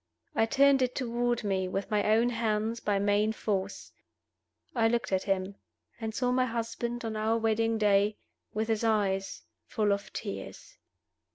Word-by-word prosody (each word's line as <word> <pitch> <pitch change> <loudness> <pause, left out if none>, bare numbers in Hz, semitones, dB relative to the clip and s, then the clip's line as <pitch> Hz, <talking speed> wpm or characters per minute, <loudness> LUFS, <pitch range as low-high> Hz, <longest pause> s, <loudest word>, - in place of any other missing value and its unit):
I 225 - +3
turned 275 +2 +4
it 250 -1 0
toward 240 -1 -1
me, 190 -2 0
with 195 +3 -3
my 210 -1 +2
own 235 +2 +3
hands, 225 -1 -1
by 205 -2 0
main 205 +2 +2
force. 200 -2 -3 0.8
I 230 -3 +3
looked 235 -1 0
at 190 -1 +2
him 195 0 -1 0.4
and 220 -1 -4
saw 250 -1 +1
my 255 0 +3
husband, 235 +1 -3
on 220 -1 -3
our 220 +1 +1
wedding 225 0 +1
day, 205 0 +3 0.3
with 220 +1 -2
his 220 0 0
eyes 200 -3 0 0.2
full 210 -2 +1
of 200 0 -2
tears. 225 - -7
220 Hz, 160 wpm, -29 LUFS, 205-235 Hz, 0.8 s, turned